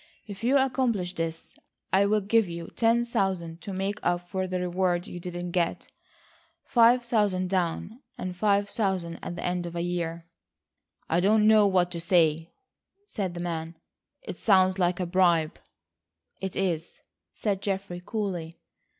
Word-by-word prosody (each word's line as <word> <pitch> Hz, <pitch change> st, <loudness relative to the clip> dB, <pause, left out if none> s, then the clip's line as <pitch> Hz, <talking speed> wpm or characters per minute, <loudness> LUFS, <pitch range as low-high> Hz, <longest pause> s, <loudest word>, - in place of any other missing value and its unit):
If 205 Hz, 0 st, -9 dB
you 260 Hz, +4 st, +4 dB
accomplish 250 Hz, -9 st, 0 dB
this, 165 Hz, -1 st, -5 dB, 0.4 s
I 195 Hz, +1 st, +5 dB
will 210 Hz, +1 st, +2 dB
give 205 Hz, 0 st, +2 dB
you 170 Hz, 0 st, -6 dB
ten 235 Hz, +1 st, +3 dB
thousand 185 Hz, -7 st, -2 dB
to 200 Hz, -, -6 dB
make 195 Hz, +2 st, -2 dB
up 175 Hz, 0 st, -1 dB
for 190 Hz, +1 st, -2 dB
the 185 Hz, 0 st, -2 dB
reward 180 Hz, 0 st, 0 dB
you 175 Hz, -, -8 dB
didn't 175 Hz, 0 st, -5 dB
get,—five 230 Hz, +6 st, 0 dB
thousand 205 Hz, -6 st, +1 dB
down, 190 Hz, +6 st, -2 dB, 0.2 s
and 185 Hz, -6 st, -5 dB
five 200 Hz, +1 st, +2 dB
thousand 190 Hz, -6 st, -2 dB
at 175 Hz, -, -5 dB
the -, -, -5 dB
end 180 Hz, -1 st, -1 dB
of 170 Hz, -, -8 dB
a 170 Hz, -, -1 dB
year." 170 Hz, -1 st, -3 dB, 0.8 s
"I 165 Hz, -, +2 dB
don't 210 Hz, +3 st, +4 dB
know 215 Hz, -1 st, +6 dB
what 180 Hz, -2 st, +2 dB
to 170 Hz, -, -4 dB
say," 165 Hz, -2 st, +2 dB, 0.5 s
said 195 Hz, -, -4 dB
the 175 Hz, -, -4 dB
man. 165 Hz, -1 st, -4 dB, 0.5 s
"It -, -, -7 dB
sounds 190 Hz, -2 st, +3 dB
like 175 Hz, 0 st, +1 dB
a 180 Hz, -, 0 dB
bribe." 175 Hz, -3 st, +2 dB, 0.8 s
"It 190 Hz, -1 st, -4 dB
is," 175 Hz, -4 st, -2 dB, 0.3 s
said 200 Hz, -3 st, -2 dB
Geoffrey 195 Hz, -3 st, -3 dB
coolly. 180 Hz, -6 st, -4 dB
185 Hz, 155 wpm, -27 LUFS, 175-205 Hz, 0.8 s, know